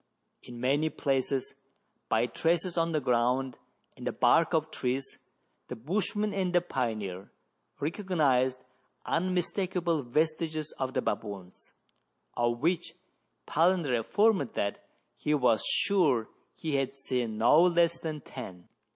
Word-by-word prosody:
In 120 -1 -10
many 140 +5 +1
places, 135 -3 -1 0.6
by 110 +2 +3
traces 170 +8 0
on 165 -1 +1
the 155 - +1
ground 125 +1 +1 0.4
and - - -7
the - - +1
bark - - +3
of - - +2
the - - -27
trees, 130 +2 -3 0.5
the - - -5
bushman 205 - -1
and 185 -2 -1
the 175 - +6
pioneer 110 - -3 0.5
recognized 145 -6 +1 0.5
unmis 180 +1 0
takable 175 -5 -1
vestiges 155 +3 -1
of 130 -1 -2
the 130 - +1
baboons, 100 -4 -5 0.6
of 120 0 0
which 170 +2 0 0.5
Palander 165 -6 +2
affirmed 200 - +2
that 100 0 -2 0.3
he 150 - +1
was 120 -7 +3
sure 155 - +2 0.3
he 155 -3 -2
had 135 0 -1
seen 125 -5 -2
no 120 +8 +6
less 170 -1 +3
than 155 -2 -5
ten. 95 -11 -9
140 Hz, 130 wpm, -29 LUFS, 125-170 Hz, 0.6 s, the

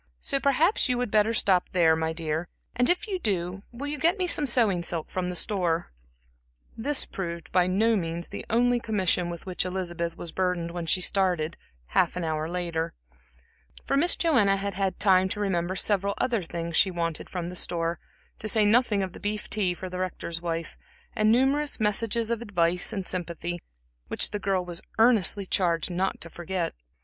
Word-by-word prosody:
So 275 - 0
perhaps 280 - +3
you 250 - +1
would 245 -3 -2
better 215 +1 +3
stop 190 -5 +2
there, 165 -3 +4
my 160 0 -1
dear; 160 0 -3 0.3
and 245 0 +2
if 355 +1 +2
you 385 -3 -2
do, 185 - -2
will 245 +4 -6
you 290 0 -3
get 340 +5 +3
me 370 - 0
some 300 -4 +2
sewing 225 -8 +3
silk 170 -2 -2
from 180 -1 -2
the 180 - -4
store?" 175 -4 0 0.8
This 280 +6 +2
proved 170 -3 -6
by 180 -1 +3
no 220 +5 +3
means 170 -2 -3
the - - -6
only 245 +1 +3
commission 190 -6 0
with 170 -1 -7
which 185 -1 -1
Elizabeth 175 -2 -3
was 170 - -6
burdened 180 -2 -1
when 170 -1 -5
she 185 - +3
started, 180 -4 +1 0.3
half - - +2
an 180 - -3
hour 155 0 -2
later; 170 -2 -3 0.9
for 275 - 0
Miss 335 +6 +5
Joanna 225 - +3
had 200 0 -3
had 190 0 -2
time 190 -2 +4
to 205 - -4
remember 185 -3 -1
several 200 0 +1
other 240 -5 +1
things 170 -1 -5
she 190 - +5
wanted 170 -3 -3
from 175 -2 -4
the 180 - -8
store, 170 -1 0 0.4
to 215 - -4
say 215 0 +4
nothing 210 -2 +3
of 185 -2 -5
the - - -10
beef 210 +1 -4
tea 190 -5 +1
for 185 - -7
the 180 0 -6
Rector's 170 -2 -4
wife, 165 -1 -3 0.4
and 215 0 +3
numerous 270 +5 +2
messages 225 +2 0
of 235 -1 -1
advice 180 -5 +1
and 195 -4 -4
sympathy, 175 -1 -4 0.5
which - - +2
the 210 - -3
girl 190 -2 0
was 175 -1 -5 0.2
earnestly 220 -4 +4
charged 175 -2 +1
not 185 +2 -1
to 170 - -8
forget. 175 0 -3
185 Hz, 190 wpm, -27 LUFS, 170-220 Hz, 0.9 s, Miss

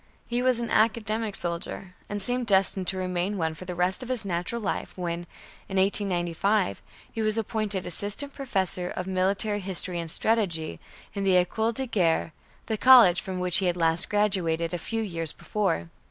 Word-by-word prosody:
He 240 +1 -1
was 255 -1 +2
an 235 -1 -4
academic 220 -1 +1
soldier, 175 +1 -4 0.2
and 205 - -3
seemed 245 +4 +2
destined 190 -2 +3
to 190 - +3
remain 185 +2 -2
one 160 -2 -1
for 170 +4 -9
the 180 -1 -5
rest 180 +4 0
of 250 - -7
his 245 -5 -1
natural 180 +5 -2
life 210 - -4
when, 175 -1 -4 0.4
in 190 - -3
1895, 190 - +1 0.3
he 225 - -4
was 215 0 +1
appointed 215 -3 -2
Assistant 205 - -3
Professor 190 -9 -1
of 185 - -4
Military 195 +3 0
History 185 -2 -3
and 165 -1 -4
Strategy, 175 -6 0 0.3
in 200 - -3
the 190 -1 +3
École 220 +6 +1
de 265 - -1
Guerre, 170 -8 0 0.3
the 220 -2 -3
college 240 -9 +7
from 190 -2 -5
which 180 -1 +2
he 190 - 0
had 175 0 0
last 165 +1 +3
graduated, 180 -6 0
a 175 - -2
few 225 +6 -3
years 165 -6 +1
before. 180 - -2
190 Hz, 180 wpm, -26 LUFS, 175-215 Hz, 0.4 s, college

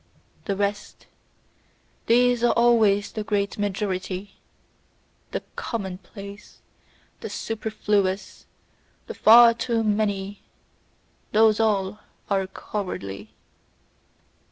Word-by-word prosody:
The 200 - -1
rest: 205 +1 -3 1.0
these 245 +1 +3
are 240 - +4
always 220 -4 +3
the 215 - -4
great 205 -1 -1
majority, 190 -1 -3 0.9
the - - -4
common 190 -6 -4
place, 200 0 -12 0.6
the - - -6
superfluous, 210 -3 -2 0.6
the - - -7
far 230 +1 +7
too 230 -1 -1
many 205 -2 -1 0.9
those 220 0 +4
all 210 -2 0 0.3
are 195 -1 +1
cowardly! 110 - -6
205 Hz, 85 wpm, -24 LUFS, 195-225 Hz, 1.0 s, far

